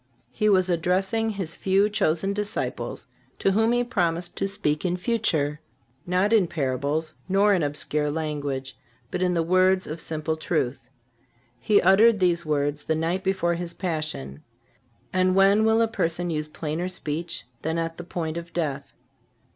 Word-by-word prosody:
He 215 +11 +1
was 185 -2 +4
addressing 190 +6 +1
His 190 -6 -4
few 195 +2 +2
chosen 195 -1 0
disciples, 210 0 -3 0.3
to 195 - +2
whom 220 +4 +3
He 245 0 +2
promised 175 -7 -1
to 195 - 0
speak 150 -7 -1
in 180 -1 0
future, 165 -9 0 0.5
not 185 +5 +2
in 205 -6 +4
parables 150 +1 -2 0.2
nor 200 +2 +4
in 185 - +2
obscure 150 0 -1
language, 145 -4 -3 0.4
but 180 - -2
in 180 -1 +2
the 165 - +2
words 185 +2 +3
of 160 +2 -6
simple 160 0 -2
truth. 135 -6 -2 0.7
He 210 -1 +4
uttered 210 +4 +6
these 170 -3 +1
words 145 -1 -1
the 160 - +1
night 170 +4 -1
before 190 -3 +1
His 170 0 -4
Passion. 155 - -3 0.7
And 185 0 +2
when 195 +2 +5
will 220 +1 +4
a - - +2
person 175 -4 -1
use 155 -1 -2
plainer 155 +3 -3
speech 170 -4 -4 0.2
than 160 +1 -1
at 165 0 -3
the 175 - -6
point 165 -2 -4
of 170 0 -7
death? 145 -5 -3
170 Hz, 160 wpm, -25 LUFS, 155-195 Hz, 0.7 s, uttered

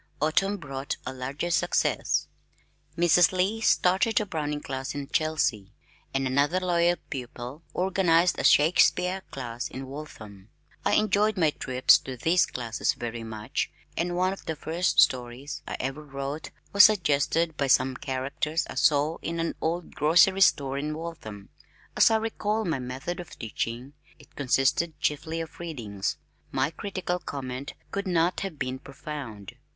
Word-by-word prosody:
Autumn 195 +7 +1
brought 140 -5 -5
a 130 - -4
larger 135 +7 -4
success. 165 - +1 0.7
Mrs. 175 0 +5
Lee 190 +4 0
started 195 +2 +3
a 215 - -1
Browning 150 -5 -3
Class 135 +1 -4
in 140 -1 -4
Chelsea, 150 - 0 0.4
and 135 0 0
another 140 +7 +2
loyal 175 -1 +2 0.2
pupil 125 +2 -6
organized 180 -2 +2
a - - -1
Shakespeare 180 +4 +4
class 125 -5 -5
in 135 +1 -7
Waltham. 110 -8 -10 0.3
I - - +1
enjoyed 210 0 +2
my 160 -4 +3
trips 130 -2 +4
to 130 -1 -7
these 170 +8 +3
classes 120 -2 -1
very 120 -1 -5
much 110 -1 -3 0.3
and 175 +2 -1
one 185 +1 +1
of 195 - -12
the 160 - -2
first 165 +4 0
stories 125 +3 +1
I - - -4
ever 135 +3 -3
wrote 140 +1 -5 0.2
was 200 0 +9
suggested 165 -4 +2
by 140 -2 0
some 130 0 +3
characters 140 +4 -2
I - - -7
saw 150 +2 +3
in 165 0 -3
an 165 - -1
old 170 +1 -2
grocery 175 +6 +4
store 140 -6 +3
in 150 +1 -3
Waltham. 120 -12 -8 0.5
As - - +6
I 225 - +3
recall 220 -1 -1
my 160 -6 -1
method 130 +8 -5
of 175 - -9
teaching, 120 +4 -4 0.2
it 145 - -20
consisted 140 +4 +1
chiefly 160 +3 -1
of 160 0 -9
readings. 115 - -4 0.3
My 135 +3 0
critical 180 0 -3
comment 135 -3 -6 0.2
could 200 0 -3
not 175 0 +2
have 195 -6 -5
been 130 -1 -3
profound. 135 -8 -8
150 Hz, 150 wpm, -27 LUFS, 130-175 Hz, 0.7 s, was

